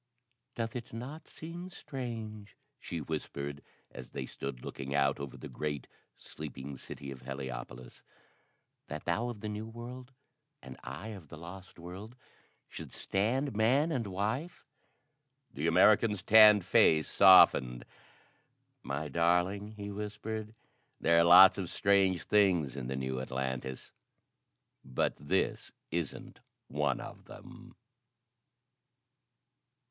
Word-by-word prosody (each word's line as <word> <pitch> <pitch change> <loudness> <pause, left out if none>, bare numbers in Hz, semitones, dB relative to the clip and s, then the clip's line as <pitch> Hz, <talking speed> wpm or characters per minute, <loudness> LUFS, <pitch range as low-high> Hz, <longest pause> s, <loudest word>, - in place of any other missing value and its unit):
"Doth 115 -1 -3
it 120 -3 -6
not 135 +7 -7
seem 170 +3 -8
strange," 115 - -7 0.2
she 85 -9 -5
whispered 70 -2 -5 0.3
as 60 - -10
they - - -5
stood 65 -3 -7
looking 70 +1 -5
out 70 -1 +2
over 70 -2 -7
the - - -8
great, 75 -4 -4 0.3
sleeping 70 -2 -8
city 70 +1 -9
of 65 -2 -9
Heliopolis, 65 -2 -7 0.9
"that 75 +1 -7
thou 95 +8 0
of 110 -4 -7
the 110 - -4
New 105 +1 -5
World 120 +3 -9 0.5
and 65 0 -11
I 70 - -7
of 95 -8 -9
the 75 - -11
Lost 90 +3 -11
World, 95 +7 -9 0.5
should - - -9
stand 120 +6 -1
man 130 +9 +3
and 120 -8 -1
wife?" 110 - -3 0.9
The 75 +4 -2
American's 100 +3 +4
tanned 105 -3 +8
face 80 -1 +4
softened. 65 -10 +6 1.0
"My 70 +4 -4
darling," 90 +7 +1
he 100 -1 -7
whispered, 105 +1 -5 0.4
"there 85 0 +4
are - - +6
lots 95 +3 +8
of 90 -3 -3
strange 95 -3 +2
things 90 -10 +2
in 65 -3 -5
the 65 - -3
new 65 -1 -3
Atlantis 65 0 -4 0.9
but 65 -1 -1
this 70 - -1 0.2
isn't 85 -2 -4 0.3
one 75 0 0
of - - -10
them." - - -13
90 Hz, 120 wpm, -31 LUFS, 70-110 Hz, 1.0 s, tanned